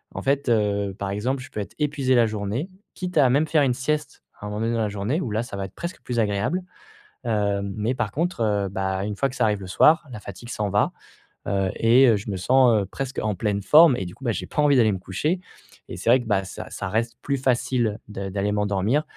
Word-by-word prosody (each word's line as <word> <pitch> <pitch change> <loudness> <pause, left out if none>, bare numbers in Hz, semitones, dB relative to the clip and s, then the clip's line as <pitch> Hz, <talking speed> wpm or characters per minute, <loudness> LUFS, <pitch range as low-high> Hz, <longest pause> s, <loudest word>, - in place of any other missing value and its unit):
en - - -4
fait, 140 +1 0
heu, 100 -3 +1
par 100 - -3
exemple 125 +6 -2
je - - -13
peux - - -5
être 100 - -6
épuisé 140 -3 +1
la 120 -1 +5
journée, 110 - -3 0.3
quitte 180 -2 -4
à 135 -4 +6
même 145 +5 +2
faire 155 -1 +3
une 130 -3 +2
sieste 150 +3 -3 0.2
à - - -8
un - - -4
moment 105 +1 -4
donné 115 +1 0
dans 115 - 0
la 110 - +1
journée 105 +9 -2
où 125 - -3
là 110 +2 0
ça 110 -4 -7
va 100 - -3
être - - -12
presque 170 +1 -6
plus 125 - -4
agréable. 105 - 0 0.6
Heu, 105 -3 0
mais 105 +5 -2
par 120 -4 -2
contre, 170 -3 -2
heu, 105 -3 +1
bah, 95 0 -2
une 105 0 -3
fois 135 +6 0
que 130 - -10
ça - - +3
arrive 105 -2 0
le 95 - -7
soir, 155 - +4
la 120 - -7
fatigue 105 +4 -10
s'en 105 -4 -2
va, 100 +1 +2 0.6
heu 95 -1 +1
et 120 +4 +5
heu, 115 - +5
je 100 - -7
me 95 - -3
sens, 120 +1 +4
heu, - - -6
presque 135 +7 -5
en 105 -2 -1
pleine 100 +1 -1
forme 150 - +6
et 95 - -3
du 90 - -9
coup, - - -16
bah, 120 - +1
j'ai 100 - -4
pas - - -1
envie 145 -2 +4
d'aller 110 -4 +4
me 95 - -4
coucher 150 - -2 0.5
et - - -6
c'est 95 - -1
vrai 125 +2 +6
que, - - -10
bah, 100 -2 +1
ça 95 - -8
ça 100 - -5
reste 115 +3 -1
plus 140 - -1
facile 120 -4 0
de 100 -2 -5
d'aller 100 +1 -1
m'endormir 105 +7 +1
110 Hz, 260 wpm, -24 LUFS, 100-135 Hz, 0.6 s, à